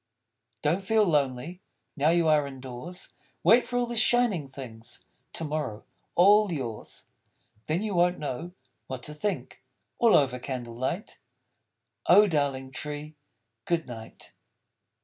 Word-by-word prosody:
_ - - -55
Don't 170 +6 +1
feel 220 +2 +3
lonely, 150 +2 0 0.3
Now 150 0 +3
you 170 -1 +3
are 150 -2 +4
in 135 -1 -9
doors. 130 +8 -7 0.3
Wait 240 +2 +6
for 245 - -2
all 245 - +2
the 240 0 -5
shining 220 - +3
things 125 -4 -10 0.3
To - - -2
morrow, 150 -8 -3 0.3
all 205 +2 +6
yours! 120 -9 -5 0.6
Then 165 +6 0
you 215 -2 -2
won't 175 0 +3
know 150 +5 -5 0.3
what 130 -1 -6
to 150 - -6
think! 200 +7 -4 0.4
All 235 -2 +6
over 130 -3 +1
Candle 125 -2 -5
light. 130 - -4 0.9
_Oh, 210 +1 +8
darling 140 -5 -1
Tree, 150 +2 -6 0.5
Good 170 -2 0
night. 115 -2 -10
150 Hz, 140 wpm, -28 LUFS, 130-180 Hz, 0.9 s, Oh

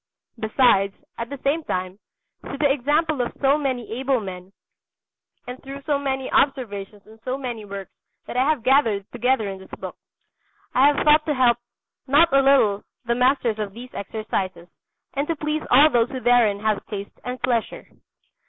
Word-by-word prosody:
Besides, 215 -3 +3 0.2
at 230 0 -4
the 280 - -6
same 300 +4 +1
time, 185 -4 -4 0.4
through 275 - -7
the 285 -1 +3
example 295 +2 0
of 240 - -3
so 275 0 +4
many 260 -6 -3
able 265 -1 +1
men 185 -2 -8 0.9
and 250 +1 -8
through 275 +1 -9
so 290 -1 0
many 265 -2 -2
observations 210 -7 -1
on 220 +1 -17
so 255 +2 -2
many 240 -5 -5
works 195 -1 -8 0.3
that - - -8
I 260 +4 +2
have 300 -7 0
gathered 230 -7 +3
together 250 -4 +1
in 195 -1 -6
this 190 - -14
book, - - -7 0.8
I 265 +3 +5
have 290 -1 +1
thought 300 0 +6
to 300 - +1
help 245 -2 +3 0.5
not 300 +5 +4
a 275 - +6
little 245 -7 +3 0.2
the 235 - +1
masters 250 -3 +1
of 205 -2 -4
these 250 +2 -10
exercises 190 -4 -4 0.5
and 280 +2 -2
to 330 - -1
please 305 0 -2
all 290 +5 +6
those 240 -1 +2
who 265 - -5
therein 235 -5 +3
have 215 -1 0
taste 200 -2 -7
and 250 +1 -5
pleasure. 240 -2 -1
250 Hz, 175 wpm, -23 LUFS, 215-275 Hz, 0.9 s, thought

